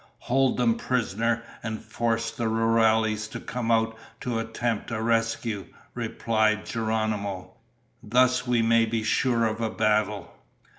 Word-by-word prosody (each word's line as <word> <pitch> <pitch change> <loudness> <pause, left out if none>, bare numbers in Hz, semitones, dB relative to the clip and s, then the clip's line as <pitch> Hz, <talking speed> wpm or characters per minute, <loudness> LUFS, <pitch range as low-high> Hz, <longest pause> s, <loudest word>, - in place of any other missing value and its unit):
"Hold 135 +1 +2
them 120 -2 +2
prisoner 115 -1 0 0.2
and 110 -1 -4
force 115 -1 -1
the 115 - -4
rurales 110 -1 +2
to - - -6
come 120 -1 -4
out 115 0 +2 0.3
to 120 -2 -1
attempt 115 0 -2
a 115 -2 -2
rescue," 115 -2 0 0.3
replied 110 -1 0
Geronimo. 110 -4 -2 0.5
"Thus 125 +3 +2
we 120 -2 +2
may 115 0 +4
be 110 0 -1
sure 115 +1 +2
of 110 +1 -2
a 110 - 0
battle." 105 -2 0
115 Hz, 135 wpm, -26 LUFS, 110-115 Hz, 0.5 s, may